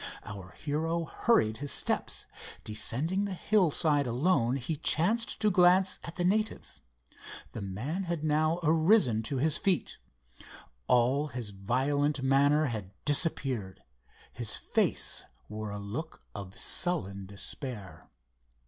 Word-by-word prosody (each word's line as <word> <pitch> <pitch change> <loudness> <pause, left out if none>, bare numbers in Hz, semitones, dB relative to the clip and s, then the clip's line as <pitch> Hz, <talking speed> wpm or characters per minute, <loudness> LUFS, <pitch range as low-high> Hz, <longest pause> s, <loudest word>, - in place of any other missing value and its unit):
Our 100 -4 -8
hero 165 +3 -2
hurried 110 - +1
his 145 0 -2
steps. - - 0 0.4
Descending 135 - -1
the 195 -2 -4
hillside 160 -8 +2
alone 125 -1 +1
he 140 +4 -3
chanced 195 +9 +1
to 210 -1 +3
glance 180 +1 +4
at 165 - -8
the 175 - -2
native. 215 +4 -1 0.7
The 110 - -7
man 125 - -4
had 170 -3 -3
now 155 +2 +1
arisen 160 - +3
to 120 +5 -3
his 155 +4 +2
feet. 190 -3 -1 0.9
All 130 +5 +3
his 120 -6 -6
violent 135 +8 0
manner 140 +3 +3
had 110 -8 -4 0.2
disappeared. 135 - 0 0.5
His 115 -2 0
face - - -1 0.2
wore 110 0 -6
a 100 - -5
look 110 +11 -6
of 100 -2 -8
sullen 100 - +1
despair. 100 - -7
145 Hz, 120 wpm, -30 LUFS, 110-170 Hz, 0.9 s, glance